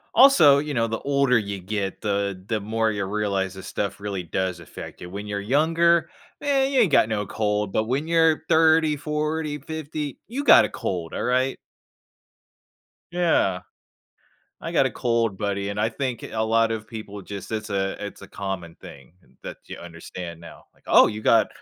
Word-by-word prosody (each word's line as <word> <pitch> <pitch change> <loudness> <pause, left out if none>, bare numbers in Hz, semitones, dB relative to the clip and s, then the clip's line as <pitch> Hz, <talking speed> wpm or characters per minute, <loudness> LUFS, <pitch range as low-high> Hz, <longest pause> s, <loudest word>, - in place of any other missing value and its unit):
Also, 215 - +7
you 150 0 -3
know, 115 -2 +1
the 115 0 -3
older 140 -3 +2
you 100 -2 -3
get, 95 +1 -3
the 100 -2 -2
the 110 -2 -1
more 110 +2 0
you 105 -2 -2
realize 100 -1 -1
this 95 -1 -9
stuff 100 0 -3
really 100 -3 -4
does 90 +1 -2
affect - - -10
you. 90 - -8
When 100 +3 -7
you're 100 -1 -3
younger? 165 +7 +3 0.3
Man, 275 -2 +2
you 270 - +3
ain't 200 -8 +3
got 110 - +4
no 105 -2 -1
cold. 105 0 -1
But 110 - +2
when 135 +7 -1
you're 165 -1 +3
30, 160 -1 +4
40, 150 +1 -2
50, 150 -1 -5
you 275 +5 -4
got - - +8
a - - -1
cold, 90 -9 -4
alright? 130 +2 0 1.5
Yeah. 160 - +2 1.0
"I - - -5
got - - +4
a - - -1
cold, 115 -4 0
buddy," 100 -1 -2
and 100 +1 -3
I 110 - +2
think, 125 +1 -4
eh, - - -7
a 110 - -1
lot 115 0 +2
of 110 -1 -4
people 110 -2 -8
just 100 0 -8
it's 110 -1 -4
a 95 0 -2
it's 100 - -8
a 100 - -11
common 95 -4 -5
thing 70 +3 -14 0.3
that - - -8
you - - -8
understand 85 0 -9
now. 85 - -13
Like, - - -32
"Oh, - - +7
you 110 - -4
got 115 0 +4
110 Hz, 185 wpm, -24 LUFS, 100-150 Hz, 1.5 s, got